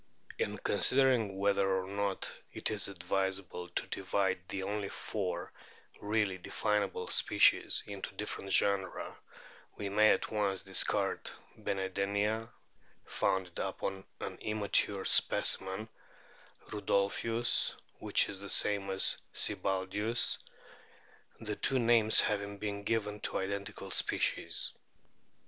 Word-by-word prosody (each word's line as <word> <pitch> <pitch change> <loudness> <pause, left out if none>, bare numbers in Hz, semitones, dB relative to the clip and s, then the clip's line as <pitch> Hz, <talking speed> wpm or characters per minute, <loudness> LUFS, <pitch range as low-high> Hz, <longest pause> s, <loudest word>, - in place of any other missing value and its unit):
In - - -1
considering 125 -7 +2
whether 100 -1 +2
or 95 - -5
not 100 -1 -2 0.2
it - - -2
is 105 -1 +2
advisable 95 -1 -3
to 90 - -2
divide 95 0 -1
the 95 - -3
only 100 0 -3
four 90 -5 -4 0.5
really 105 -3 0
definable 105 +2 -1
species - - +3
into 100 -1 -7
different 100 -1 -5
genera 100 -1 +1 0.6
we 100 - -3
may 110 +2 +5
at - - +1
once 100 -3 0
discard - - +1 0.3
Benedenia, 100 +3 -1 0.6
founded 95 -2 -1
upon 95 0 -3 0.2
an - - -5
immature 105 -2 0
specimen, 95 +3 +3 0.8
Rudolphius, 105 +3 +1 0.2
which - - +3
is 100 - -7
the 100 0 -8
same 100 0 +1
as 95 0 +4 0.2
Sibbaldius, 100 +4 0 1.0
the 105 -2 -4
two 135 - +1
names 115 -2 +5
having 100 -1 -2
been 100 0 -4
given 105 -2 -1
to - - 0
identical 100 +1 -4
species. - - +2
100 Hz, 110 wpm, -32 LUFS, 95-105 Hz, 1.0 s, may